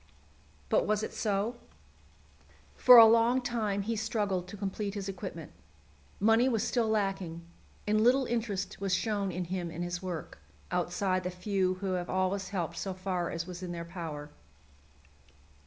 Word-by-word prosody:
But - - +2
was 215 0 +1
it - - -4
so? 210 +3 -1 1.2
For 250 -1 +9
a 230 - +12
long 230 +3 +4
time 220 -5 -1
he 225 +3 -2
struggled 205 -4 -1
to 205 - -9
complete 200 +1 -3
his 200 -1 -4
equipment. 195 - -6 0.7
Money 225 +4 +4
was 225 -4 0
still 235 -3 +1
lacking, 195 -6 -1 0.4
and 215 +1 +2
little 260 +3 +4
interest 215 -6 -3
was 195 -2 +1
shown 200 0 -1
in 180 +1 -3
him 175 -1 -3
and 165 +1 -5
his 175 0 -4
work, 180 -4 -6 0.3
outside 185 +1 0
the 180 - -2
few 185 0 0
who 190 0 -3
have 180 -1 -2
always 185 0 0
helped 170 -4 -3
so 190 +1 -3
far 185 -2 -2
as 165 0 -3
was 180 0 -8
in 180 -1 -5
their 170 0 -5
power. 160 -4 -7
195 Hz, 160 wpm, -30 LUFS, 180-215 Hz, 1.2 s, a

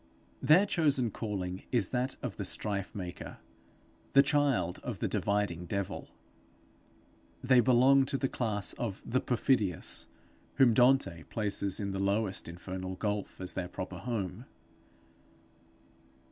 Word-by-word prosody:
Their 175 +7 +6
chosen 145 - +1
calling 95 -4 -4
is 115 -7 +1
that 125 +1 -1
of - - -4
the - - -3
strife 100 -2 -3
maker, 90 -3 -6 0.8
the 140 - +8
child 140 - +1
of - - -5
the - - -1
dividing 100 -4 -1
devil. 100 +1 -3 1.3
They 130 0 +5
belong 130 +3 +5
to 135 +1 0
the 135 - 0
class 110 -6 -1
of 105 -5 -5
the 130 +2 0
perfidious, 110 -7 +1 0.5
whom 130 -4 +5
Dante 125 -8 +3
places 100 -3 -1
in 100 -2 -2
the 95 - -3
lowest 100 0 0
infernal 95 +2 -6
gulf 105 +1 -3
as 95 -1 -4
their 90 -2 -3
proper 90 0 -6
home. 110 -7 -4
105 Hz, 130 wpm, -31 LUFS, 95-130 Hz, 1.3 s, the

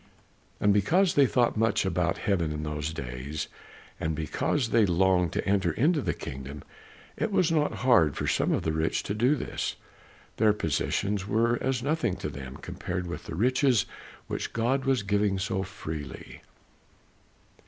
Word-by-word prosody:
And 105 0 +4
because 170 - +3
they 140 -2 +5
thought 120 -1 +2
much 110 -3 +2
about 90 -2 0
heaven 85 -6 0
in 75 0 -4
those 75 0 -3
days 70 +1 -5 0.5
and 80 0 -1
because 80 - -1
they 115 -1 +4
longed 90 -2 +3
to - - -2
enter 100 0 +2
into 150 +4 +2
the - - -1
kingdom, 70 +2 -7 0.5
it 220 - -1
was 180 -4 +3
not 150 -2 +2
hard 85 - +5
for - - -2
some - - +1
of - - 0
the 80 - 0
rich 80 +1 0
to - - -3
do 120 +7 +3
this. 135 - -3 0.6
Their 110 -1 +4
possessions 100 +3 -1
were 115 +3 +2
as 130 -2 0
nothing 140 - 0
to 75 - -4
them 65 -3 -8
compared 90 0 -4
with 85 0 -6
the - - -6
riches 125 - +3 0.4
which - - -4
God 130 +4 0
was 135 -5 +2
giving 100 0 +1
so 95 0 -1
freely. 80 -6 -7
100 Hz, 165 wpm, -28 LUFS, 80-120 Hz, 0.6 s, they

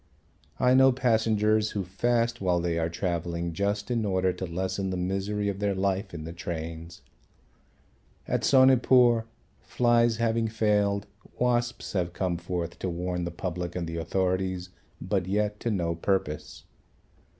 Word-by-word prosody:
I 125 0 +4
know 130 0 +6
passengers 110 -3 +2
who 100 - 0
fast 115 +6 0
while 90 -2 +2
they 85 -1 -1
are 80 0 0
travelling 85 -1 -2
just 100 +5 -1
in 115 -2 +1
order 95 -2 +1
to 90 +1 -5
lessen 95 +3 -2
the 90 - -2
misery 100 +3 -1
of 100 -1 -2
their 100 -1 0
life 95 +1 -1
in 85 -2 -7
the 80 +1 -7
trains. 85 0 -6 1.2
At - - -1
Sonepur 125 -3 +5 0.3
flies 120 -2 +2
having 115 -1 +1
failed, 105 -2 +1 0.3
wasps 120 0 0
have 90 -3 -1
come 90 -2 -1
forth 85 0 -4
to 95 - -2
warn 90 0 -3
the - - -2
public 85 0 -4
and 90 -1 -2
the 80 0 -5
authorities, 95 +1 -1 0.3
but 95 0 -1
yet 105 +1 0
to 120 - -2
no 85 -6 0
purpose. 85 -3 -2
95 Hz, 150 wpm, -27 LUFS, 85-110 Hz, 1.2 s, know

